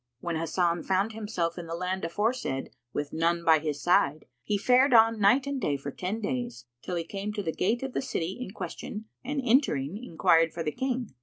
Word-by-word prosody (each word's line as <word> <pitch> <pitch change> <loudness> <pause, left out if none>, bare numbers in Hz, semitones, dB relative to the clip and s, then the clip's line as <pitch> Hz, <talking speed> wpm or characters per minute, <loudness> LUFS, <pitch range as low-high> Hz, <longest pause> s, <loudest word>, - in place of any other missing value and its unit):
When 170 +2 -3
Hasan 170 +1 0
found 195 +3 +1
himself 185 -6 -2
in 170 - -7
the 165 - -4
land 185 +2 -2
aforesaid 205 - -1 0.2
with 145 +2 -4
none 170 +1 +1
by 160 -1 +6
his 150 -2 -3
side 155 -4 +3 0.2
he 205 +11 0
fared 255 +5 +4
on 225 0 +6
night 225 +7 +4
and 280 -2 -3
day 145 - 0
for 140 +1 -6
ten 190 +9 -3
days, 240 - -3 0.2
till 180 - -4
he 170 - -1
came 200 +4 -4
to 205 -1 -3
the 160 -3 -2
gate 235 +7 0
of 265 -1 -4
the - - 0
city 190 -7 -3
in 250 - -4
question 195 +3 -6 0.2
and 280 +3 -2
entering, 215 - +2
enquired 165 -4 +3
for 165 - -3
the 155 - -1
King. 255 - -2
185 Hz, 210 wpm, -28 LUFS, 165-230 Hz, 0.2 s, by